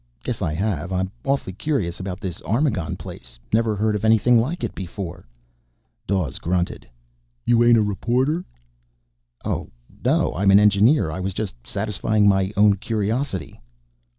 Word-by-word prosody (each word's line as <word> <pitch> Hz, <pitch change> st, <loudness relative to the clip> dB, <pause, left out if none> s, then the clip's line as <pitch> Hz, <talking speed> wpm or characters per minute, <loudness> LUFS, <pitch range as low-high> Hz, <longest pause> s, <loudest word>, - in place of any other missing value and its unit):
"Guess -, -, -3 dB
I 75 Hz, -, 0 dB
have. 95 Hz, -2 st, -2 dB
I'm 95 Hz, 0 st, -1 dB
awfully 135 Hz, -8 st, -1 dB
curious 100 Hz, -, -2 dB
about 95 Hz, -1 st, -5 dB
this 90 Hz, -4 st, -5 dB
Armagon 110 Hz, -, 0 dB
place. -, -, -9 dB, 0.2 s
Never 110 Hz, -1 st, +2 dB
heard 105 Hz, +1 st, +1 dB
of 105 Hz, -, -3 dB
anything 115 Hz, +2 st, +5 dB
like 150 Hz, +10 st, -2 dB
it -, -, -2 dB
before." 90 Hz, -3 st, -7 dB, 0.8 s
Dawes 90 Hz, -8 st, -1 dB
grunted. 90 Hz, +1 st, -2 dB, 0.6 s
"You 120 Hz, 0 st, +4 dB
ain't 120 Hz, -1 st, +6 dB
a 110 Hz, -, +4 dB
reporter?" 125 Hz, -, 0 dB, 1.0 s
"Oh, -, -, -2 dB, 0.3 s
no. -, -, +2 dB
I'm 100 Hz, +2 st, +2 dB
an 100 Hz, +1 st, +8 dB
engineer. 105 Hz, -, +4 dB
I 90 Hz, -, -5 dB
was 95 Hz, 0 st, -3 dB
just 105 Hz, -3 st, -3 dB
satisfying 105 Hz, -, 0 dB
my 95 Hz, -1 st, +3 dB
own 100 Hz, -1 st, +5 dB
curiosity." 105 Hz, -, -2 dB
100 Hz, 150 wpm, -22 LUFS, 95-115 Hz, 1.0 s, an